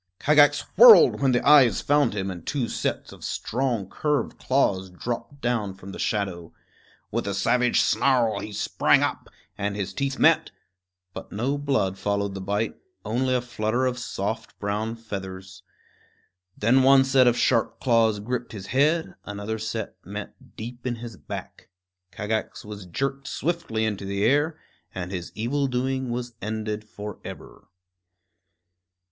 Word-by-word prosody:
Kagax 145 0 +5 0.2
whirled 225 -9 +9
when 135 -2 +3
the 125 - +1
eyes 135 -8 +7
found 145 -6 +2
him 95 -1 -2
and 90 -3 -8
two 130 - -2
sets - - -3
of - - -13
strong 120 -5 -2
curved 150 +6 -1
claws 95 -8 +1
dropped 120 +9 -6
down 110 -5 -1
from 95 0 -10
the - - -9
shadow. 95 -6 -2 0.6
With - - -2
a 100 - -1
savage 120 +5 +2
snarl 125 -5 +2
he 105 - -6
sprang 100 - +2
up, - - -3 0.3
and 100 0 -1
his 100 -2 -4
teeth 140 -1 -2
met; - - +4 0.6
but - - -9
no 125 +7 -1
blood 135 -10 0
followed 100 -1 -1
the 95 - -6
bite, 100 +3 -1 0.3
only 130 +3 0
a 125 - +1
flutter 120 +1 -1
of 125 -1 -1
soft - - -4
brown 105 +3 -2
feathers. 95 -4 -8 1.0
Then 120 +5 +4
one 135 0 +6
set 135 -1 +4
of 120 0 +3
sharp 115 -3 +1
claws 115 -4 +3
gripped 120 +3 -4
his 100 -3 -7
head; 155 +5 +2
another 105 +2 -5
set 110 0 -4
met - - -9
deep 120 +3 -7
in 120 - -1
his 115 -1 -8
back. - - -9 0.4
Kagax 110 +2 -3
was 105 -3 -8
jerked 135 +9 -3
swiftly 150 -9 -2
into 100 -2 -3
the 100 +1 -1
air, 145 +6 +2 0.4
and 90 0 -4
his 90 -3 -5
evil 135 +6 0
doing 130 0 -1
was 120 0 -4
ended 110 0 -3
forever. 105 -1 -9
115 Hz, 150 wpm, -25 LUFS, 100-130 Hz, 1.0 s, whirled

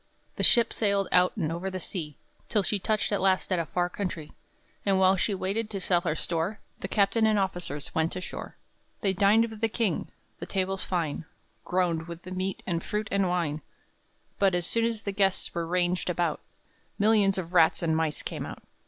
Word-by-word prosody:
The - - -2
ship 235 -2 +6
sailed 200 -3 +1
out 180 +4 +4
and 160 -6 -1
over 175 +3 -3
the 185 0 -4
sea, 155 -6 -6 0.3
Till 210 - +2
she 205 +2 0
touched 215 +3 0
at 205 - 0
last 190 0 +2
at 185 - +2
a 165 - -2
far 175 -1 0
country; 175 -5 -5 0.5
And 195 -1 +2
while 190 0 +5
she 195 +2 0
waited 205 +4 -2
to 200 - -4
sell 180 -2 +2
her 165 -4 -1
store, 170 +6 -2 0.2
The - - -4
captain 220 +2 +2
and 215 -1 +3
officers 175 -7 -2
went 160 +2 0
ashore. 185 - -6 0.5
They 195 -3 +2
dined 205 +4 +4
with 220 0 -10
the 225 - +2
king; 215 -7 -1 0.3
the - - -6
tables 190 0 -1
fine 165 -3 -2 0.4
Groaned 175 -3 0
with 170 0 -8
the 185 - -9
meat 185 +1 -3
and 170 -2 -2
fruit 210 0 -3
and 195 -2 +2
wine; 165 -4 -1 0.8
But, 195 -2 +4
as 175 -1 0
soon 230 +5 +1
as 230 -2 -2
the 200 - -2
guests 195 -1 +1
were 170 -1 -2
ranged 180 +1 +1
about, 170 -3 0 0.6
Millions 205 -2 +4
of 180 -1 -5
rats 165 -1 +4
and 160 -1 +2
mice 160 -2 -1
came - - -5
out. - - -9
185 Hz, 200 wpm, -28 LUFS, 170-200 Hz, 0.8 s, ship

